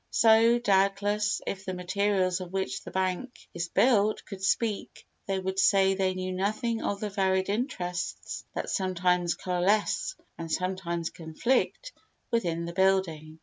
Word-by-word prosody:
So, 225 +1 +5
doubtless, 205 0 +1
if 195 -1 -4
the 185 -1 -4
materials 185 0 0
of 180 -1 -7
which 190 -9 -2
the - - -9
bank 190 +7 -3
is 175 0 -3
built 215 -2 +3
could 195 -2 -9
speak, 215 +1 -1 0.2
they 195 -1 0
would 190 0 -2
say 195 0 +4
they 190 -1 0
knew 185 0 -3
nothing 215 +5 -1
of 200 - -2
the 210 -1 -3
varied 190 -1 +1
interests 185 -6 -3
that - - -3
sometimes 180 -2 +1
coalesce 195 - 0 0.2
and 165 -1 -5
sometimes 180 -2 -2
conflict 245 - -1 0.4
within 170 -7 0
the 170 - -6
building. 175 -5 +1
190 Hz, 145 wpm, -28 LUFS, 180-205 Hz, 0.4 s, So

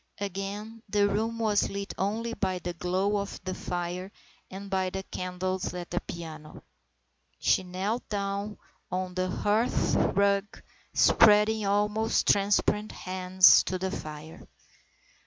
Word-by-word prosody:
Again 200 +3 -5
the 205 0 +3
room 220 +3 -1
was 215 -3 +1
lit 200 0 -5
only 225 +4 -2
by 190 -4 -1
the 175 0 -5
glow 185 +4 0
of 200 0 -4
the 185 0 -3
fire 180 +2 -4 0.4
and 195 +1 -8
by 190 -1 0
the 190 +1 -5
candles 185 0 -3
at 175 -1 -6
the 175 - -1
piano. 160 -2 -9 0.7
She - - +2
knelt 190 +6 -3
down 200 0 -3 0.3
on 185 0 -2
the 185 0 -1
hearth 210 +5 +1
rug, 200 0 +1 0.3
spreading 210 0 +5
almost 210 +2 +1
transparent 205 +1 +2
hands 185 0 +5
to 185 - -2
the 190 +1 -3
fire. 155 -3 -8
195 Hz, 130 wpm, -28 LUFS, 185-205 Hz, 0.7 s, spreading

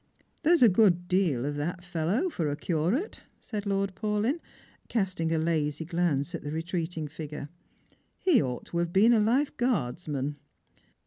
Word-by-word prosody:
" - - -41
There's 330 -2 +5
a - - +9
good 180 -4 +4
deal 175 -10 +1
of 145 0 -2
that 175 +5 -3
fellow 180 - 0
for 165 - -1
a 145 - -1
curate," 175 - -1 0.2
said 210 -2 -5
Lord 195 -1 0
Paulyn, 215 - 0 0.5
casting 185 -7 -1
a 165 - +2
lazy 155 -1 0
glance 170 -2 0
at 170 - -4
the 145 - -5
retreating 165 0 -3
figure; 150 -1 -7 0.4
" - - -36
he 345 - +4
ought 125 -1 -3
to 170 - -3
have 170 0 -1
been 215 +6 +5
a 225 - +4
lifeguardsman." 185 - 0
175 Hz, 165 wpm, -28 LUFS, 155-210 Hz, 0.5 s, a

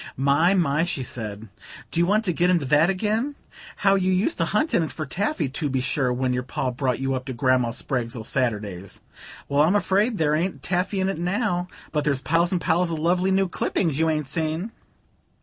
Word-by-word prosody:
"My, 140 +8 +3
my!" 160 -4 +2
she 160 -6 -2
said, 110 -3 -6 0.4
"do 170 - -1
you 170 - +3
want 215 +3 +2
to 180 - 0
get 175 +2 +2
into 170 -6 +2
that 150 +5 +4
again? 220 +8 -1 0.4
How 195 -1 +3
you 190 -1 +2
used 200 - +1
to - - +2
hunt 310 - 0
in - - +4
it 160 - -2
for 155 - -5
taffy, 200 - -1
to 145 +2 -2
be 130 -1 0
sure, 130 0 0
when 125 +1 0
your 125 - 0
Pa 125 +1 -3
brought 125 0 -1
you 135 0 -1
up 130 -1 -2
to 130 - -4
Grandma 130 -1 +2
Spragg's 125 -1 -3
o' 110 - -6
Saturdays! 105 -7 -3 0.4
Well, 140 +1 +2
I'm 165 +6 +4
afraid 205 +3 +2
there 150 -3 +2
ain't 175 +5 0
any - - -17
taffy 190 +2 -1
in 190 - +1
it 195 -4 -2
now; 180 0 -1 0.2
but 150 -2 0
there's 140 -2 0
piles 170 +2 +2
and 180 - +1
piles 170 +1 +1
of 165 - -2
lovely 180 +4 +1
new 190 0 +2
clippings 165 -3 -1
you 160 0 +3
ain't 150 -3 -1
seen." 160 +7 -2
160 Hz, 220 wpm, -24 LUFS, 130-185 Hz, 0.4 s, that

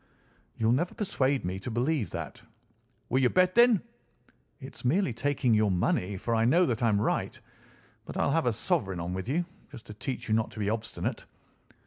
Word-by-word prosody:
"You'll 110 0 +2
never 160 +9 0
persuade 140 - 0
me 90 +1 -3
to 100 - -6
believe 120 - 0
that." - - -6 0.7
"Will 130 - +2
you 125 - +4
bet, 185 +3 +3
then?" 235 -4 +5 0.8
"It's 135 -1 -11
merely 145 - +2
taking 130 0 +1
your 110 -1 +3
money, 95 +1 0
for 115 +5 -2
I 115 0 +2
know 165 +10 +4
that 120 -4 -1
I 115 - +3
am 100 -2 +2
right. - - -1 0.7
But - - -7
I'll - - +2
have - - +1
a - - +2
sovereign 95 -2 -1
on 85 +2 -3
with 95 +5 -4
you, 170 +5 0 0.3
just 125 -6 -11
to 105 - -9
teach 125 +4 -5
you 110 - +1
not 110 0 +1
to - - -9
be 105 0 0
obstinate." 115 0 -4
120 Hz, 195 wpm, -29 LUFS, 105-145 Hz, 0.8 s, then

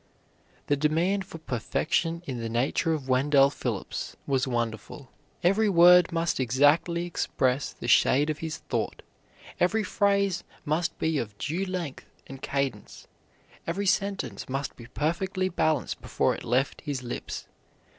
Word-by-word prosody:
The 145 - +2
demand 165 +7 +1
for 175 - -9
perfection 165 +5 -1
in 130 -5 -4
the 115 0 -3
nature 125 +7 +1
of 150 -5 -2
Wendell 135 +1 +4
Phillips 115 -8 -4
was 135 -1 +1
wonderful. 120 +2 -4 0.3
Every 200 +5 +3
word 180 -1 +7
must 165 -2 0
exactly 145 +7 +3
express 135 -5 0
the - - -7
shade 145 +4 +4
of 150 - -6
his 160 -1 -4
thought; - - -3 0.6
every 210 +5 +2
phrase 200 -2 +1 0.2
must 165 +3 -1
be 160 -2 0
of 105 -3 -5
due 165 - -2
length 175 -7 -5 0.2
and 135 0 -10
cadence; 135 -7 -3 0.6
every 190 +5 -1
sentence 200 -4 -1
must 135 +1 -3
be 120 - -12
perfectly 185 +7 -1
balanced 155 -5 0
before - - +1
it - - -7
left 130 +4 0
his 140 -4 -4
lips. 120 - -5
155 Hz, 140 wpm, -27 LUFS, 130-175 Hz, 0.6 s, word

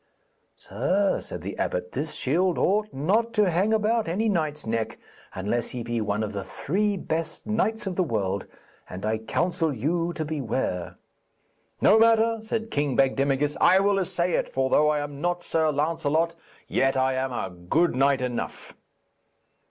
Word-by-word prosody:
'Sir,' 185 - 0
said - - -7
the - - -5
abbot, 485 -1 -2
'this - - -3
shield 175 +6 +1
ought 210 +2 +1
not 210 +12 0
to 210 -4 +3
hang 190 +6 +2
about 220 0 +2
any 200 +7 0
knight's 155 -7 -1
neck 115 0 -2 0.4
unless 105 +5 -1
he 125 -2 -5
be 120 0 -2
one 105 +1 -1
of 105 0 -4
the 100 -1 -3
three 200 +5 -1
best 165 -2 -3
knights 220 0 0
of 185 -2 -3
the 185 - +3
world, 100 - -2 0.4
and 95 +3 -6
I 110 0 0
counsel 165 - 0
you 165 +7 -1
to 155 - -3
beware.' 130 - -2 0.9
'No 220 - +6
matter,' 225 0 +4
said 220 0 -3
King 145 -2 0
Bagdemagus, 135 +2 +2
'I 185 - +6
will 200 0 +2
essay 175 -1 -1
it, - - 0
for 130 0 -1
though 150 0 +5
I 150 -1 +1
am 145 -1 -6
not 175 0 -1
Sir 160 -1 +1
Lancelot, 160 +2 0 0.3
yet 135 0 +1
I 130 0 +2
am 130 0 -1
a 95 -6 -3
good 90 - 0
knight 135 0 +3
enough.' 125 -1 -4
155 Hz, 165 wpm, -26 LUFS, 130-195 Hz, 0.9 s, No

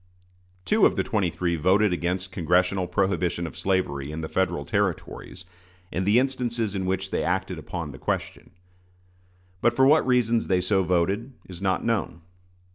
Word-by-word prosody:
Two - - +5
of - - -3
the - - +1
twenty 100 -5 0
three 85 +1 -1
voted 95 +5 +3
against 90 +2 -2
congressional 90 +2 +1
prohibition 90 -2 0
of 80 - -7
slavery 75 -7 -1
in 80 +1 -5
the 80 - -4
Federal 90 -1 -1
Territories, 95 -2 -3 0.5
in 90 +2 -2
the 105 +4 +4
instances 120 -5 0
in 95 -2 -2
which 95 +1 -2
they - - 0
acted 90 -1 -1
upon 80 0 -5
the 70 - -11
question. - - -3 1.1
But 120 0 +3
for 130 - +5
what 150 0 +5
reasons 120 -2 +2
they 90 -1 +2
so 95 +2 +1
voted 95 +8 0
is 90 -1 -10
not 95 -1 0
known. 100 -8 -1
95 Hz, 165 wpm, -25 LUFS, 85-105 Hz, 1.1 s, Two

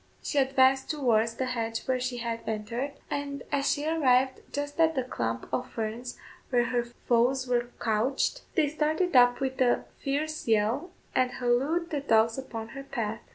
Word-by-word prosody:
She 290 - 0
advanced 265 0 +3
towards 230 -7 +2
the 260 - -1
hedge 230 -3 -2
where 260 -1 +1
she 250 0 -2
had 230 -1 -3
entered, 230 +6 -3 0.2
and 280 -1 -3
as 280 0 +2
she 290 - -1
arrived 265 -5 +3
just 290 +2 -4
at 320 -1 +4
the 260 - +1
clump 115 - -3
of 255 - -1
ferns 230 +2 -4 0.3
where 245 -2 +3
her 240 -1 +1
foes 245 +2 +1
were 240 -1 0
couched, 240 - 0
they 315 -5 +3
started 310 +3 0
up 245 -1 +6
with 265 -1 -2
a 245 -1 +3
fierce 305 +2 -2
yell, 225 - +2 0.2
and 255 -1 +3
hallooed 275 +8 0
the 295 - 0
dogs 230 -3 +3
upon 230 -4 -6
her 275 - -7
path. 225 -5 -3
255 Hz, 170 wpm, -28 LUFS, 235-280 Hz, 0.3 s, up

